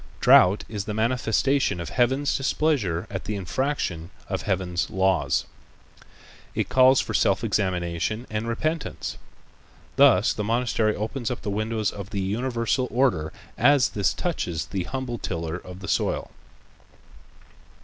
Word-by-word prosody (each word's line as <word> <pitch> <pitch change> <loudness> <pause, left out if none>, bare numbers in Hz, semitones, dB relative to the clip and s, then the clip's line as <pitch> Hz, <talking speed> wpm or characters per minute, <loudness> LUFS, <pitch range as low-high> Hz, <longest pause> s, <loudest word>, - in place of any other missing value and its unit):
Drought 95 +3 +6
is 105 -3 -5
the 105 - -4
manifestation 125 +1 +1
of 85 - -5
Heaven's 130 +4 +1
displeasure 135 - 0
at 95 -2 -5
the 105 - -3
infraction 95 - -2 0.2
of - - -2
Heaven's 90 -2 -1
laws. 95 -5 +1 1.1
It - - -1
calls 130 0 +6
for - - -2
self - - +2
examination 95 +3 -1
and 110 +1 -3
repentance. 155 +7 -3 0.8
Thus 130 -7 +5
the 105 - -3
monastery 115 -1 +1
opens 115 +3 -3
up 125 - -5
the 105 - -2
windows 110 +1 -1
of 100 -1 -8
the 100 - -3
universal 115 +5 -1
order 120 - +1 0.3
as 140 +1 +5
this 100 -2 0
touches 90 - -3
the 95 -3 -4
humble 130 -1 -4
tiller 85 -1 -3
of 90 +1 -11
the 100 - -7
soil. - - -1
110 Hz, 135 wpm, -25 LUFS, 95-130 Hz, 1.1 s, Drought